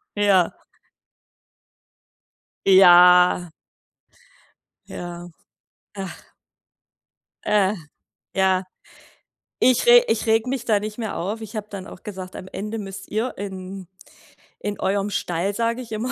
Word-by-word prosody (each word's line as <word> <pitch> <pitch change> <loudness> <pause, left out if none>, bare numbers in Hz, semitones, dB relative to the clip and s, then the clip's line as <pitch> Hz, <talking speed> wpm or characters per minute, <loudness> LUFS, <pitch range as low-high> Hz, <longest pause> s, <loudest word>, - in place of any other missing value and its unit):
Ja. 200 -4 +3 2.1
Ja. 180 -2 +7 1.4
Ja. 175 0 -8 0.7
Ach. 195 -3 -9 1.1
Äh, 205 -2 +2 0.6
ja. 190 -1 +2 1.0
Ich 255 - +3
re 485 0 +8
ich 225 - -1
rege 225 +2 +2
mich 260 -1 -3
da 215 -3 +2
nicht 215 +2 -7
mehr 220 -2 -4
auf. 205 +6 -4
Ich 220 0 -9
habe 215 -1 -4
dann 195 -2 -8
auch - - -13
gesagt: 190 -3 -8
„Am 185 - -8
Ende 215 +3 -5
müsst 195 -2 -8
ihr 225 +4 -2
in 190 -1 -7 0.7
in 205 -1 -5
eurem 200 +1 0
Stall“, 180 0 -2
sage 230 +3 -1
ich 225 -3 -9
immer, 230 +4 -3
200 Hz, 115 wpm, -22 LUFS, 185-220 Hz, 2.1 s, re